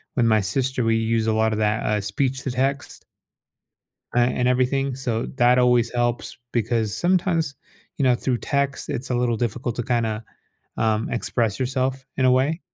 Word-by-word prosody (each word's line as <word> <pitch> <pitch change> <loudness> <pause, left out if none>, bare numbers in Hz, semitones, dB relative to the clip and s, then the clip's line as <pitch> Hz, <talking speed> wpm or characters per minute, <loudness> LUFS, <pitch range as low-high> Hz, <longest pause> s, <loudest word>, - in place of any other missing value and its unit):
With 120 - +3
my 110 -1 +4
sister, 125 +6 -1
we 115 0 +3
use 115 0 0
a 110 - +2
lot 110 0 +2
of 110 - -2
that, 105 0 +1
uh, 105 -1 +1
speech 130 +7 -1
to 135 - -2
text 135 +3 -2 1.1
uh, 120 - +4
and 125 0 +1
everything 130 +2 +1
so, 120 -3 -2
that 125 -1 +4
always 125 -2 +3
helps 120 0 -1 0.2
because 115 -3 0
sometimes, 175 -4 +1 0.4
you - - 0
know, 125 -1 +5
through 120 +1 -1
text, 140 0 -1
it's 130 +2 -4
a - - +1
little 120 -1 +1
difficult 120 +1 -2
to 120 - -1
kinda, 115 -2 -1 0.5
um, 110 -1 0
express 115 -3 -1
yourself 130 +1 -1
in 130 - +1
a - - +5
way. 135 +6 +2
125 Hz, 180 wpm, -23 LUFS, 115-130 Hz, 1.1 s, know